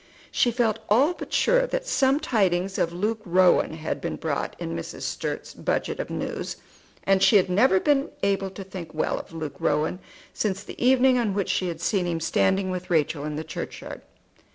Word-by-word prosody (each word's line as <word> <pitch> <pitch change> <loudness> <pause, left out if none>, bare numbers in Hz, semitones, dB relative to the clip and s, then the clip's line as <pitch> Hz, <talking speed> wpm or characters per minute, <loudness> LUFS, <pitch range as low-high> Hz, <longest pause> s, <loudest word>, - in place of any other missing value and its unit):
She 245 - +3
felt 230 -2 +1
all 270 - +4
but - - -9
sure - - +3
that - - -2
some 280 - +2
tidings 195 - +1
of 170 - +1
Luke 210 +5 -2
Rowan 180 -3 +3
had 160 0 -4
been - - -3
brought - - -3
in 80 - -4
Mrs. 85 - -6
Sturt's - - -4
budget - - -2
of - - -3
news, - - -4 0.5
and 195 -1 +3
she 215 - +5
had 185 -2 +4
never 195 +1 +4
been 285 +4 +2
able 195 -1 +1
to 195 +1 -8
think 185 -4 -9
well 155 - 0
of - - -11
Luke 155 -4 -6
Rowan 150 +4 0 0.3
since 200 -2 -2
the - - -7
evening 255 0 +5
on 215 -5 0
which 200 -2 -1
she 185 - 0
had 170 - -5
seen 190 -4 +1
him 165 -1 -1
standing 190 +3 +1
with 180 0 -5
Rachel 155 -3 +1
in 150 0 -3
the 155 - -3
churchyard. 160 - -7
190 Hz, 195 wpm, -25 LUFS, 170-235 Hz, 0.5 s, she